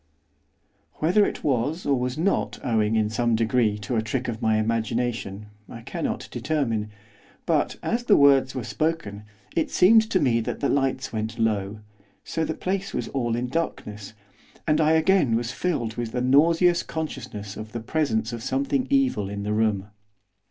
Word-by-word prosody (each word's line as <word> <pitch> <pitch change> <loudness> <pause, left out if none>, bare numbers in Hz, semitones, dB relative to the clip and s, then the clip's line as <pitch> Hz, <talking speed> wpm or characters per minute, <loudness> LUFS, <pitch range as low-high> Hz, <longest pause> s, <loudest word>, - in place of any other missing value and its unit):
Whether 180 +7 +3
it - - -6
was, 145 +6 0
or 140 - +3
was 125 +2 -2
not, 185 +5 0
owing, 110 -2 +1
in 110 -1 +2
some 115 +1 +1
degree, 110 -1 +1
to 105 +4 -4
a - - +2
trick 125 +4 -3
of 115 -1 -4
my 110 -1 +2
imagination, 115 -2 -2 0.2
I 115 - -9
cannot - - -4
determine, 115 -9 -1 0.6
but, - - +1
as 240 +1 -1
the 210 - +5
words 135 -2 +5
were 130 - -3
spoken, 105 -8 -2 0.3
it 165 - +1
seemed 220 +4 +5
to 190 - +2
me 125 -7 +2
that - - -4
the 140 - 0
lights 135 -2 0
went 110 0 -3
low, 105 -2 -1 0.4
so 160 - -3
that 160 - -1
the - - -14
place 195 +1 -2
was - - -3
all 120 -4 -1
in 120 +1 -1
darkness, 110 -9 -4 0.5
and 155 0 +3
I 155 +1 +4
again 160 -6 +3
was 120 +1 -1
filled 125 -12 -2
with 120 -2 -4
the 125 - -1
nauseous 165 +7 +4
consciousness 120 -10 -6
of 110 0 -8
the 115 - -4
presence 115 -3 -1
of 115 - -5
something 270 - -1
evil 270 - +1
in 100 0 -5
the 105 +1 -1
room. 105 -3 +1
125 Hz, 175 wpm, -25 LUFS, 110-160 Hz, 0.6 s, the